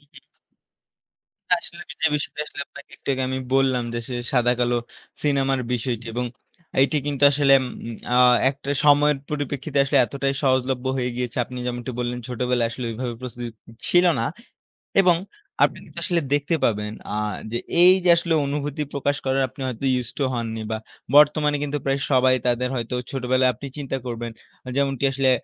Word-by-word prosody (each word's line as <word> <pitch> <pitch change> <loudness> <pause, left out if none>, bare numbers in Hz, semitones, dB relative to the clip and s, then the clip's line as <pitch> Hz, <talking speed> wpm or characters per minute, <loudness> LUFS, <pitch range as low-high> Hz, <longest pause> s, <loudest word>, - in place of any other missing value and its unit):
উম। 145 -1 -17 1.3
আসলে 170 0 -1 0.2
যে - - +5
বিষয়টা 150 0 -3
আসলে 145 - -8
আপনাকে 140 - -14
একটু - - -13
আগে 130 0 -1
আমি 130 0 -2 0.2
বললাম 130 -2 +3
যে, - - -1
সে 130 - -4 0.2
সাদাকালো 120 -1 +2 0.5
সিনেমার 135 -2 +1
বিষয়টি 120 -1 -2
এবং 125 +1 -1 0.6
এটি 140 +3 +2
কিন্তু 145 -1 -3
আসলে 140 -1 +4
উম 130 - -3 0.4
অ্যা 125 - +2 0.3
একটা 140 0 -7
সময়ের 145 0 +5
পরিপ্রেক্ষিতে 145 -1 -2
আসলে 140 +1 0
এতটাই 135 +3 -2
সহজলভ্য 130 -1 +1
হয়ে 125 -1 -1
গিয়েছে। 125 -2 -3
আপনি 125 +1 -8
যেমনটি 120 0 -3
বললেন 125 0 -2
ছোটবেলায় 125 -1 0
আসলে 120 +1 -5
ওইভাবে 120 +1 -4
প্রস্তুতি 120 -1 -6 0.2
উ - - -14 0.2
ছিল 175 0 +5 0.2
না। 115 - 0 0.8
এবং 180 -2 +5 0.5
আপনি - - +2
কিন্তু - - -9
আসলে 175 -3 +1
দেখতে 145 +3 +1
পাবেন, 105 -1 +1 0.2
অ্যা 105 - -3 0.3
যে 120 - -1 0.2
এইযে 180 0 +6
আসলে 170 -1 0
অনুভূতি 145 +1 -3
প্রকাশ 145 0 0
করার 135 0 +2
আপনি 135 - -12
হয়তো 125 0 -5 0.2
used 120 -1 -7
to - - +2
হননি 115 -2 -3
বা, 110 - 0 0.4
বর্তমানে 150 0 +5
কিন্তু 145 0 -2
প্রায় 135 0 +1
সবাই 130 -1 +5
তাদের 125 +1 +1
হয়তো 120 0 -3 0.2
ছোটবেলায় 130 -1 +2
আপনি 140 - -8
চিন্তা 135 -2 -3
করবেন। 120 -1 -4 0.3
আ - - -14
যেমনটি 140 -1 0
আসলে 135 0 +2
130 Hz, 170 wpm, -23 LUFS, 125-145 Hz, 1.3 s, এইযে